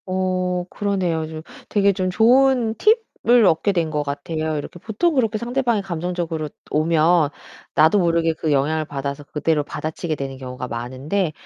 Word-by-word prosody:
어 185 -1 -1
그러네요. 180 -6 -1
좀 155 0 -7 0.3
되게 200 -1 +3
좀 185 -1 -1
좋은 240 +2 +4 0.5
팁을 240 -1 +6
얻게 165 +5 +3
된 165 -4 0
것 150 -1 -1
같아요. 155 +2 -3
이렇게 150 +4 -6
보통 265 - 0
그렇게 225 -5 +1
상대방이 240 -1 0
감정적으로 170 -3 -3 0.2
오면 160 0 +3 0.4
나도 160 +7 +5
모르게 165 -2 +2
그 155 - -2
영향을 155 +3 +1
받아서 140 0 -5
그대로 150 +1 0
받아치게 155 +2 -4
되는 135 -1 -5
경우가 125 -1 -7
많은데 135 +9 -2
165 Hz, 345 characters per minute, -21 LUFS, 150-200 Hz, 0.5 s, 팁을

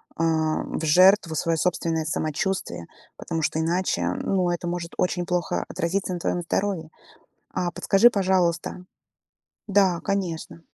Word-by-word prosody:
а, 160 -1 +1
в 160 - -4
жертву 185 +2 +5
своё 165 +1 0
собственное 165 -1 0
самочувствие. 160 - -2 0.3
Потому 165 -1 -3
что 155 +1 0
иначе, 175 +3 0 0.2
ну, 185 -2 +1
это 175 0 -3
может 175 -1 -4
очень 180 -1 0
плохо 175 -1 -1
отразиться 185 +3 -2
на 175 - -4
твоём 175 - -1
здоровье. 170 -3 -2 0.6
А 180 -1 -1
подскажи, 195 +7 +4
пожалуйста 185 -3 0 0.9
Да, 190 -3 +3
конечно. 180 -5 -3
175 Hz, 130 wpm, -24 LUFS, 165-190 Hz, 0.9 s, жертву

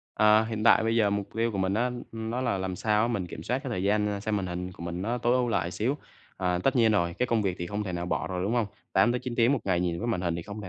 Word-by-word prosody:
Ờ, 105 +1 +5
hiện 110 -1 -3
tại 115 - +6
bây 115 +1 +1
giờ 105 -3 +3
mục 100 -1 -2
tiêu 115 0 +1
của 100 - -3
mình 95 0 +1
á, 120 +4 +1 0.2
nó 115 +2 -3
là 120 -6 0
làm 95 -1 -3
sao 105 +2 +2
á 115 - +1
mình 100 -7 -2
kiểm 80 - -8
soát 125 +9 -1
cái 135 - -5
thời 90 -6 -2
gian, 105 +1 +2
ơ, 100 -1 -3
xem 105 +1 -1
màn 95 -2 -2
hình 90 +1 -4
của 85 - -11
mình 85 +1 -4
nó 120 +4 -1
tối 120 0 +1
ưu 125 -1 +1
lại 85 -6 0
xíu. 120 +9 -1 0.4
À, 90 -1 0
tất 135 - +3
nhiên 115 -2 +4
rồi, 85 -4 +1
cái 125 - +2
công 115 -3 +1
việc 95 -3 -1
thì 85 - -3
không 105 +3 -3
thể 95 - -4
nào 85 0 -3
bỏ - - -1
rồi, 90 -1 -3
đúng 100 +4 0
hông? 120 -3 +2 0.3
8-9 120 +4 +2
tiếng 120 +2 +4
một 140 - +2
ngày 90 -3 +1
nhìn 85 -1 -1
cái 120 - -2
màn 115 -7 0
hình 85 -2 -1
thì 85 - -4
không 105 +3 -8
thể 95 - -7
105 Hz, 325 wpm, -28 LUFS, 90-115 Hz, 0.4 s, tại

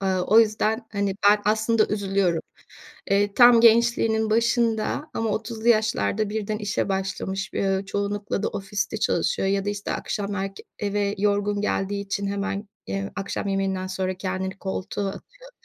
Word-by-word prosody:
Aaa, 190 -1 0
o 220 +5 +6
yüzden, 220 +1 0
hani, 200 -2 -1
ben 210 - +6
aslında 220 +1 +2
üzülüyorum. 195 -4 0 0.7
Eee, 200 0 +2
tam 240 -1 +7
gençliğinin 225 -1 +4
başında 230 +4 +1
ama 225 -1 -1
30'lu 220 +2 -2
yaşlarda 220 -2 +2
birden 210 0 -2
işe 205 -1 -1
başlamış, 195 0 -3
bi - - -3
eee, 195 -1 +1
çoğunlukla 205 0 -2
da - - +1
ofiste 200 +2 -3
çalışıyor 195 - 0
ya 195 0 0
da 205 - 0
işte 205 0 -4
akşam 200 0 -3
erk 195 0 -4 0.2
eve 205 0 -1
yorgun 205 0 +1
geldiği 200 -1 -1
için 200 0 -2
hemen, 200 +1 -3 0.2
eee, 100 0 -3
akşam 195 0 -3
yemeğinden 195 -1 -1
sonra 185 0 -2
kendini 190 +1 -4
koltuğa 195 +1 -3
atıyor. - - -11
205 Hz, 155 wpm, -24 LUFS, 195-220 Hz, 0.7 s, tam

